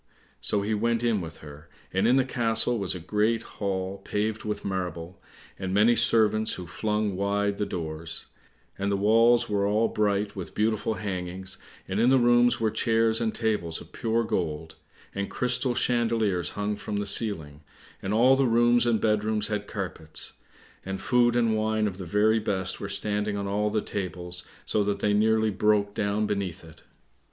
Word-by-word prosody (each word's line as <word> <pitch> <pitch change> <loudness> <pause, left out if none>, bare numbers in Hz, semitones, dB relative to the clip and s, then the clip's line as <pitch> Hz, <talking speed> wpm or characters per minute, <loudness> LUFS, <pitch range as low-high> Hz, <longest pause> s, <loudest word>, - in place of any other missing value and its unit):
So 100 -1 +1
he 110 +2 -1
went 115 +2 0
in 115 -4 +1
with 80 -1 -8
her, 75 +2 -12 0.2
and 95 +4 +2
in 125 - +5
the 135 -1 +3
castle 115 -2 0
was 95 -2 -2
a - - -5
great 105 +6 0
hall 95 -1 -4
paved 105 +2 -2
with 105 -1 -4
marble, 90 -2 -4 0.4
and 95 0 -2
many 110 +4 +5
servants, 110 -1 +3
who 90 - -6
flung 105 +4 -1
wide 100 +1 0
the 105 - -1
doors; 80 -2 -3 0.5
And 100 +1 0
the 100 - +1
walls 115 +4 +4
were 100 -1 0
all 110 +3 +2
bright 105 -1 0
with 95 -3 -7
beautiful 110 0 0
hangings, 95 -2 -5 0.3
and 95 +2 -2
in 120 +2 +4
the 135 - +5
rooms 120 0 +4
were 110 -1 +1
chairs 115 0 +1
and 115 -1 +1
tables 105 -9 -1
of - - -14
pure 115 +1 0
gold, 80 -7 -3 0.4
and 100 0 -3
crystal 125 0 0
chandeliers 115 -8 +1
hung 105 0 -1
from 105 0 -4
the 105 - -1
ceiling, 85 -8 -1 0.4
and 95 - -3
all 125 +5 +5
the 135 -1 +2
rooms 120 +1 +4
and 115 -2 +2
bed 105 -1 +1
rooms 110 -1 -1
had 105 -1 -3
carpets, 90 -6 -6 0.5
and 95 0 -4
food 120 -1 +3
and 115 -2 +2
wine 110 0 0
of 100 -2 -3
the 95 - -5
very 105 +5 +3
best 95 -3 -2
were - - -5
standing 105 0 -1
on 100 - -3
all 105 +2 0
the 105 0 -1
tables, 90 -3 -5 0.2
so 105 - +1
that 100 0 -1
they 105 +1 +1
nearly 110 +1 +3
broke 105 0 +2
down 105 +1 0
beneath 100 -5 -3
it. 80 -1 -15
105 Hz, 180 wpm, -27 LUFS, 95-110 Hz, 0.5 s, in